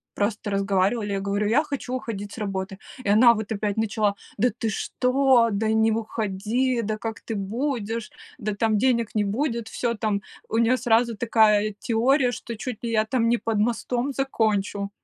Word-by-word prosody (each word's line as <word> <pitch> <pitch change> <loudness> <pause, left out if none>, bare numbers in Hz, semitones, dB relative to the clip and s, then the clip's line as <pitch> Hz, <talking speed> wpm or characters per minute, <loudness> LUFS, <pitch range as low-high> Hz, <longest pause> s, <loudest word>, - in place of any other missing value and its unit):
просто 210 +1 -1
разговаривали, 200 +2 +1
я 195 - -1
говорю: 200 +1 -1
"Я 250 +8 +3
хочу 280 -4 -5
уходить 205 -5 -5
с - - -8
работы". 195 -1 -4 0.2
И - - -5
она 225 +4 +7
вот 215 -1 -5
опять 205 -1 -1
начала: 215 -2 +1 0.2
"Да 245 +4 +4
ты 225 -2 -1
что? 255 +2 +2
Да 210 +2 0
не 220 0 +3
уходи! 225 +3 -1
Да 215 -1 -2
как 225 +1 -5
ты 225 - -5
будешь? 225 +1 -3 0.3
Да 210 0 -2
там 215 +1 +1
денег 235 -2 +1
не 215 - +1
будет!" 230 +2 -1
Всё, 235 0 -1
там 210 -2 -1 0.3
у 225 - -1
нее 230 +2 +4
сразу 235 -1 +2
такая 215 -2 +3
теория, 245 +3 +2
что 235 -2 -7
чуть 245 0 -6
ли 235 - -2
я 215 -1 +2
там 230 0 +1
не 240 - +3
под 225 -2 -1
мостом 240 +4 0
закончу. 215 -7 -1
225 Hz, 180 wpm, -24 LUFS, 205-240 Hz, 0.3 s, она